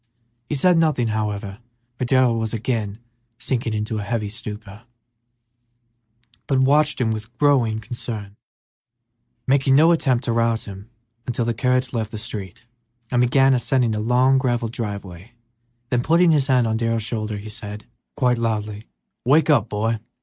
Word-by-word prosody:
He - - -1
said 170 +4 +4
nothing, 150 -8 +1
however, 105 -1 -3 0.4
for 125 - 0
Darrell 130 -2 +3
was 110 0 -2
again 110 -3 -2 0.4
sinking 120 -2 -2
into 105 +1 -2
a - - -3
heavy 105 0 -2
stupor, 105 -1 -8 1.7
but 135 - +1
watched 145 +3 +3
him 115 -3 +1
with 110 +2 -6
growing 130 -6 +3
concern, 110 -3 -6 1.1
making 135 0 +3
no 160 +4 +6
attempt 130 -7 +1
to 120 - -1
rouse 115 -1 +1
him 100 +1 -10 0.4
until 120 -1 -1
the 120 - 0
carriage 125 +2 0
left 110 -3 -2
the 110 - -7
street 105 -2 -6 0.5
and 120 -1 +2
began 135 +2 +4
ascending 120 -1 +1
a 105 - -2
long 125 +4 +3
gravelled 120 -3 -1
driveway; 100 -3 -6 0.6
then 125 -1 +2
putting 165 +5 +4
his 145 -4 +2
hand 130 -3 +3
on 110 -1 0
Darrell's 115 -1 0
shoulder, 110 -1 -3
he 100 +1 -9
said, 105 0 -7 0.3
quite 125 -4 +1
loudly, 110 -2 -2 0.4
"Wake 150 +5 +4
up, 125 -8 +4
my - - -27
boy! 110 +2 -1
115 Hz, 155 wpm, -22 LUFS, 110-130 Hz, 1.7 s, no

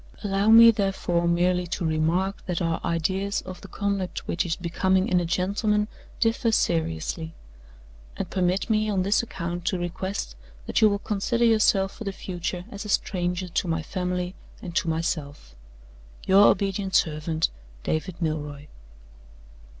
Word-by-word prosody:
Allow 200 +1 +1
me, 230 +1 +10
therefore, 190 -5 0
merely 180 +1 +2
to 175 0 -3
remark 165 +5 0
that 180 -2 -1
our 165 -2 -1
ideas 190 +4 -1
of 185 -1 -9
the - - -10
conduct 200 -2 -3
which 175 +1 -1
is 165 - 0
becoming 185 +2 +1
in 180 - +3
a 175 - -1
gentleman 205 +4 0 0.3
differ 225 0 +2
seriously; 160 - -1 0.8
and - - -3
permit 185 +1 0
me 215 -1 +1
on 195 -3 +1
this 200 +2 +3
account 175 -6 -5
to 185 - +1
request 175 - -4 0.3
that - - 0
you 215 - +7
will 200 - 0
consider 215 +4 0
yourself 205 -4 +3
for 225 - -7
the 200 - -2
future 180 -1 -5
as 200 0 -6
a 210 - -8
stranger 180 -2 0
to 175 - -1
my 165 -1 -1
family 180 +1 -3 0.3
and 175 -2 -8
to 165 - +1
myself. 150 - -3 0.7
"Your 195 +2 +7
obedient 195 -1 +1
servant, 155 0 +1 0.3
"DAVID 170 +3 -2
MILROY." 150 -2 -3
185 Hz, 150 wpm, -25 LUFS, 170-200 Hz, 0.8 s, me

